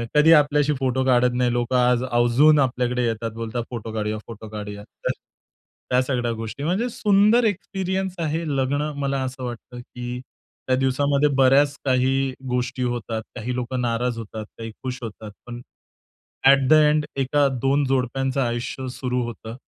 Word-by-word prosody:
कधीही 160 +2 +7
आपल्याशी 150 0 +3
फोटो 130 0 0
काढत 125 -1 +3
नाही. 125 -1 +2
लोकं 120 +1 0
आज 125 0 +3
आवर्जून 130 +5 +4
आपल्याकडे 125 -2 0
येतात 115 0 -2
बोलतात, 115 +1 -3
"फोटो 115 -2 -6
काढूया, 110 0 -2
फोटो 110 -1 -9
काढूया." 105 -1 -7
तर - - -4 0.8
त्या 125 0 +3
सगळ्या 125 -3 -1
गोष्टी 115 +5 -6
म्हणजे, 195 +10 0
सुंदर 215 +2 +3
एक्सपिरियन्स 190 -2 -2
आहे 160 +3 -2
लग्न 135 +2 0 0.2
मला 135 -1 -1
असं 130 0 -5
वाटतं, 120 0 -7
की 125 0 -7 0.5
त्या 130 - +3
दिवसामध्ये 140 +2 +2
बऱ्याच 140 +2 +4
काही 130 +1 +1 0.2
गोष्टी 125 +1 -1
होतात, 120 -2 -2
काही 125 +3 -4
लोकं 125 0 -2
नाराज 120 0 -1
होतात, 110 -1 -7
काही 115 -1 -6
खुश 130 -1 -3
होतात. 110 -1 -7 0.2
पण, 120 0 -7 0.8
अ‍ॅट 135 -1 +6
द - - +7
एंड 150 0 +4 0.2
एका 145 +2 +2
2 140 +1 +2
जोडप्यांचं 135 +1 0
आयुष्य 120 +2 -3
सुरू 125 -1 -2
होतं 115 -1 -7
125 Hz, 155 wpm, -23 LUFS, 120-140 Hz, 0.8 s, कधीही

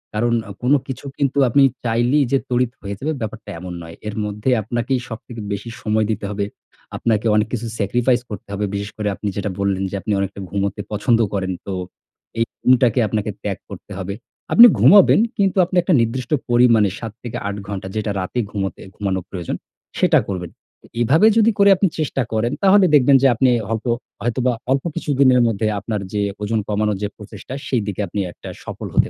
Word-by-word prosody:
কারণ 120 +2 +1 0.2
আ - - -6
কোন 125 +3 +3
কিছু 135 +1 -6
কিন্তু, 140 -1 0
আপনি 140 +4 +4 0.2
চাইলেই 120 +5 +2
যে 135 - +4
তড়িৎ 125 -1 +1
হয়ে 100 0 -5
যাবে, 155 +6 -2
ব্যাপারটা 110 0 -6
এমন 90 0 -7
নয়। 80 0 -10
এর 105 - -4
মধ্যে 105 +4 -2
আপনাকেই 120 +4 -1
সবথেকে 115 0 -8
বেশি 100 +3 -4
সময় 110 0 +1
দিতে 105 -1 -3
হবে। 100 0 -2 0.5
আপনাকে 110 -2 0
অনেক 105 0 +2
কিছু 120 -1 -2
স্যাক্রিফাইস 120 +4 +1
করতে 105 - -8
হবে। 100 +1 -1
বিশেষ 100 0 -3
করে 105 -1 -2
আপনি 105 - -5
যেটা 100 0 -2
বললেন, 100 -1 0
যে - - -4
আপনি 105 - -3
অনেকটা 100 0 -3
ঘুমুতে 100 +2 -2
পছন্দ 115 +3 +2
করেন। 95 -2 -1
তো 100 - -4 0.7
এই 115 - +3 0.2
ঘুমটাকে 125 -1 +4
আপনাকে 105 +1 -2
ত্যাগ - - -2
করতে - - -11
হবে। 100 0 -4 0.4
আপনি 235 - +10
ঘুমাবেন, 200 0 +7 0.2
কিন্তু 195 -2 +1
আপনি 185 - -6
একটা 175 +1 +1
নির্দিষ্ট 120 +2 -2 0.2
পরিমাণে, 120 -4 +5
৭ 115 - -5
থেকে 120 - -5
৮ 100 - -3
ঘন্টা, 100 -2 -5
যেটা 110 -1 -1
রাতে 95 +6 -3
ঘুমোতে 95 -2 -3
ঘুমানোর 95 -3 -2
প্রয়োজন, 90 -4 -4 0.4
সেটা - - +5
করবেন। 90 -4 -4 0.5
এভাবে 155 - +5
যদি 225 0 +5
করে 200 0 +7
আপনি 195 +1 +2
চেষ্টা 145 -3 -1
করেন, 110 +2 0
তাহলে 195 0 +6
দেখবেন 140 -1 +6
যে, - - +7
আপনি 130 +3 +3 0.2
হয়তো 115 +2 -1 0.3
হয়তোবা 120 +2 0 0.2
অল্প 135 0 +2
কিছুদিনের 135 -6 +3
মধ্যে, 110 -1 0
আপনার 105 0 -3
যে 105 - 0 0.2
ওজন 110 +2 0
কমানোর 105 -1 0
যে - - +1
প্রচেষ্টা, 105 +3 -10
সেই 125 -4 +1
দিকে 105 0 -3
আপনি 100 - -4
একটা - - -10
সফল - - -6
হতে - - +3
110 Hz, 190 wpm, -20 LUFS, 100-125 Hz, 0.7 s, আপনি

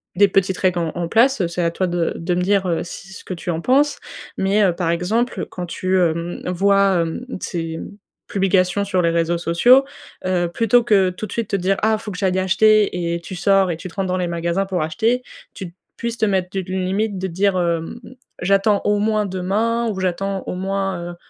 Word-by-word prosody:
des 200 +2 +5
petites 190 -1 +1
règles 180 -2 +1
en 165 -2 -1
en 175 -1 -2
place? 230 -2 +3
C'est 175 +1 -3
à 170 - +2
toi 185 +2 -1
de 175 -1 -1
de 175 +2 -2
me - - 0
dire, 195 +1 +2
heu, 170 -2 0
ce 190 +2 -10
que - - -5
tu 175 0 -6
en 160 - -2
penses. 280 +7 +2 0.4
Mais, 200 +2 +2
heu, 190 - +4
par 170 -1 -1
exemple, 215 +9 -1
quand 180 - -6
tu 185 +2 -1
hem, 170 0 -1
vois, 195 0 +3
hem, 165 +9 -4 0.2
ces 165 -2 -4 0.5
publications 195 0 +1
sur 185 -2 +1
les 170 - +2
réseaux 170 0 +1
sociaux. 175 +11 +5 0.4
Heu, 180 -1 +1
plutôt 230 +3 +3
que, 195 -5 +4
tout 185 +4 -6
de - - -13
suite, 230 -3 -3
te - - 0
dire: 195 +1 +1
«Ah 220 0 +3
faut 215 0 -8
que 180 - -7
j'aille 190 -1 +1
acheter» 190 -3 +3
et - - -3
tu 175 +2 -8
sors 195 +1 +3
et - - -2
tu 185 - -8
te - - -17
rentres 195 -1 -1
dans 185 0 -1
les 180 -1 -1
magasins 170 +3 -1
pour 185 -3 -2
acheter, 225 +11 0 0.3
tu 180 -4 -8 0.2
puisses 235 0 -4
te - - +3
mettre 190 -2 0
d 195 - -2
une 185 0 -2
limite 200 +2 -1
de 190 - -2
dire, 190 +2 +1
hem: 170 +4 -2 0.4
«J'attends 195 +2 +3
au 205 0 +2
moins 215 0 +1
demain 210 +5 -1
ou 200 -3 -4
j'attends 190 +1 -2
au - - -3
moins, 190 -2 -3
heu, - - -10
190 Hz, 220 wpm, -20 LUFS, 175-205 Hz, 0.5 s, des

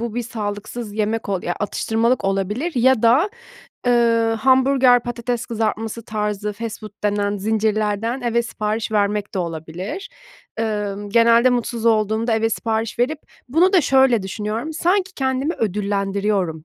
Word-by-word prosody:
bu 235 -1 -4
bir 245 - -1
sağlıksız 215 0 -5
yemek 215 0 -1
ol 190 -2 -1
ya, 175 - -2
atıştırmalık 225 +3 0
olabilir 200 - -1
ya 250 -1 +3
da, 270 - +4 0.6
eee, 230 -2 +3
hamburger, 260 -1 +4
patates 240 0 -3
kızartması 225 0 -2
tarzı 210 -1 -2
fast 225 +1 -6
food 215 -1 -9
denen 205 0 0
zincirlerden 215 +3 0
eve 235 -1 +1
sipariş 220 -1 -3
vermek 205 -1 0
de - - -1
olabilir. 170 - -5 0.5
Emm, 205 -2 -2
genelde 235 +3 +5
mutsuz 235 -1 -1
olduğumda 220 +1 +2
eve 225 0 +1
sipariş 225 +1 -2
verip 290 +5 +1 0.3
bunu 345 +8 +3
da 370 - +6
şöyle 265 -5 +3
düşünüyorum, 215 +9 -4
sanki 370 +4 +1
kendimi 265 +4 -1
ödüllendiriyorum 200 -4 -1
225 Hz, 135 wpm, -21 LUFS, 205-245 Hz, 0.6 s, da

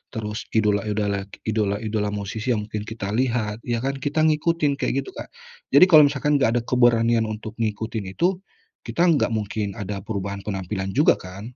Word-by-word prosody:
terus 105 0 -4
idola-idola 105 -2 0 0.2
idola-idola 105 0 -1
musisi 105 +4 -2
yang 105 - -2
mungkin 105 0 -5
kita 110 -3 -5
lihat 115 -2 0
ya 120 0 -1
kan, 135 +1 -1
kita 145 +3 0
ngikutin 155 -2 +1
kayak 135 +1 0
gitu, - - -10
Kak. - - -8 0.5
Jadi 145 - +9
kalau 155 -4 +8
misalkan 145 +1 +1
nggak 130 - +3
ada - - -5
keberanian 115 -2 +3
untuk 110 0 -6
ngikutin 110 -2 -3
itu, 180 +2 +1 0.5
kita - - -2
nggak 145 -6 +2
mungkin 105 -1 -3
ada 100 -1 -5
perubahan 100 -1 -4
penampilan 95 -1 -4
juga 145 +4 +5
kan. 95 +1 -9
110 Hz, 165 wpm, -23 LUFS, 105-130 Hz, 0.5 s, Jadi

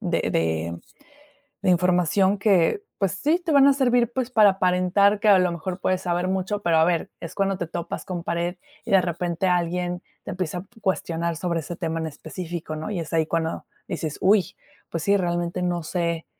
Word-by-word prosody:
de 175 -5 0
de 80 +1 -1 0.8
de - - +3
información 180 +2 +3
que, 200 - +3 0.2
pues 195 -3 +1
sí, 310 +4 +1
te 345 -3 -2
van 280 -1 +7
a - - +6
servir, 245 -3 +2
pues, 255 -1 -2
para 215 -4 +6
aparentar 190 +2 +2
que, 215 - +2
a 200 -2 +7
lo 180 -1 +2
mejor, 180 +2 -4
puedes 185 0 0
saber 175 0 -1
mucho, 190 +2 -1
pero, 170 -5 +2
a 160 - +5
ver, 170 -1 0
es 170 +1 -8
cuando 195 -1 +1
te 175 -2 -4
topas 170 0 -5
con 175 -2 -5
pared, 170 +1 -2 0.3
y,de 195 - +4
repente, 175 0 -2
alguien 180 0 0 0.2
te - - -5
empieza 180 -1 -3
a 175 - -7 0.2
cuestionar 170 -4 -1
p - - -9
sobre 170 -1 -1
ese 170 +2 -7
tema 165 -1 -2
en 160 - -2
específico, 160 +1 -6
¿no? 155 +6 -5
Y 200 - -2
es 165 -1 -6
ahí 160 -1 +2
cuando 165 0 -2 0.2
dices: 155 -2 -4
"¡Uy!", 195 0 +3 0.3
pues 165 -2 -3
sí, 200 0 +4
realmente 175 -1 -1
no 175 -1 -1
sé 170 0 -2
180 Hz, 200 wpm, -24 LUFS, 170-195 Hz, 0.8 s, van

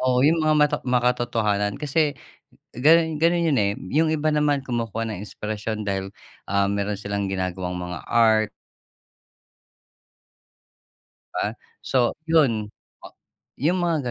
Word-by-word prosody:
oo 130 0 +2
yung 165 +2 +4
mga 155 0 +3
mata 150 0 +3
makatotohanan 120 -5 +1
kasi 150 0 0 0.6
ganun 160 +5 +4
ganun 170 0 +3
yun, 145 -5 +2
eh, 100 0 0 0.2
yung 160 +1 +3
iba 155 0 0
naman 150 -1 +2
kumukuha 115 -2 -2
ng 105 -3 -5
inspirasyon 105 0 -5
dahil, 95 0 -2 0.4
ah, 100 0 +3
meron 100 0 -1
silang 100 -1 -3
ginagawang 90 -1 -3
mga 90 0 -5
art. 110 -2 +3 2.8
Di - - -3
ba, - - +1 0.3
so, 130 - -1
ah, - - -8
yun 130 -10 +3 0.9
yung 175 +6 +2
mga 160 -8 0
120 Hz, 130 wpm, -23 LUFS, 100-150 Hz, 2.8 s, yung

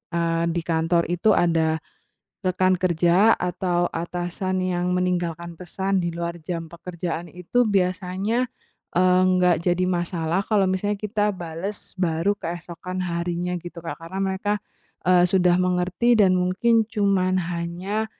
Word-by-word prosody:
eee 165 0 +1
di 170 - 0
kantor 165 +1 +1
itu 190 +4 +3
ada 160 -2 +2 0.6
rekan 185 0 +2
kerja 180 +4 +4
atau 175 0 0
atasan 175 +2 -2
yang 180 0 0
meninggalkan 170 -2 -2
pesan 190 +2 -1
di 175 - -1
luar 170 0 -4
jam 165 +1 -4
pekerjaan 170 0 -5
itu 180 +8 0
biasanya, 195 +4 0 0.5
eee, 185 +1 +4
nggak 180 -2 +4
jadi 180 +1 +2
masalah 175 0 -1
kalau 205 -3 +3
misalnya 205 +2 -1
kita 210 0 0
bales 175 +4 -6
baru 170 +3 +1
keesokan 175 +2 -5
harinya 175 0 -2
gitu, 175 0 -9
Kak. 165 - -4
Karena 165 +4 -7
mereka, 195 +2 0 0.5
eee, 180 -1 +6
sudah 180 -1 +3
mengerti 180 +6 +2
dan 190 -3 +5
mungkin 210 +6 +3
cuma 200 -4 +1
hanya 180 +4 -2
180 Hz, 130 wpm, -24 LUFS, 170-190 Hz, 0.6 s, eee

